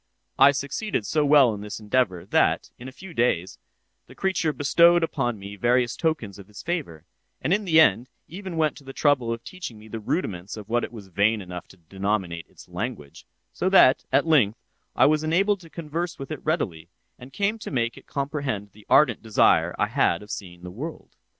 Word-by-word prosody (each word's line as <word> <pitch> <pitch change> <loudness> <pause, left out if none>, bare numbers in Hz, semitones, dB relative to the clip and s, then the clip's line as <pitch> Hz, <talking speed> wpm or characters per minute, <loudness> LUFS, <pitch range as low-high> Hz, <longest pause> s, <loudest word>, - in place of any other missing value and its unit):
I 135 +1 +9
succeeded 140 - -2
so 155 +5 +1
well 140 -5 +5
in 100 - -7
this 105 +1 -6
endeavor 105 -5 0
that, - - +1
in 125 - -9
a - - -8
few 175 +6 -12
days, 95 - 0 0.5
the - - -15
creature 190 -5 0
bestowed 170 +4 +4
upon 120 -8 -1
me 100 +1 -9
various 120 +3 +1
tokens 150 - -2
of 95 - -12
his 105 -3 -11
favor, 140 - -4 0.3
and 170 - 0
in 210 +1 0
the 160 -3 +5
end 125 -3 +4 0.2
even 185 0 -7
went 155 -2 +1
to 145 - -13
the 135 0 -9
trouble 135 -6 +2
of 115 0 -4
teaching 175 -12 -8
me 105 +1 -14
the 115 +1 -6
rudiments 100 - -3
of 105 -2 -9
what 120 +1 0
it - - -5
was 105 -5 -11
vain 105 +5 +2
enough 90 -2 -8
to 95 - -18
denominate 95 -1 -3
its - - -16
language; 70 -1 -6 0.3
so 185 - 0
that, 160 -9 +6
at 135 +3 +3
length, 125 -10 +3 0.4
I - - +5
was 155 +1 +3
enabled 195 +6 +2
to 165 -2 -15
converse 170 +1 -4
with 135 +2 -8
it 155 - -6
readily, 90 - -2 0.3
and 125 +2 -12
came 205 +6 -1
to - - -7
make 115 -4 -1
it - - -15
comprehend 140 -8 -3
the 105 0 -19
ardent 130 -8 +4
desire 110 -2 +3
I - - +2
had 85 - +1
of 105 - -10
seeing 90 -3 -8
the 90 - -7
world. 150 - -8
125 Hz, 205 wpm, -25 LUFS, 100-160 Hz, 0.5 s, I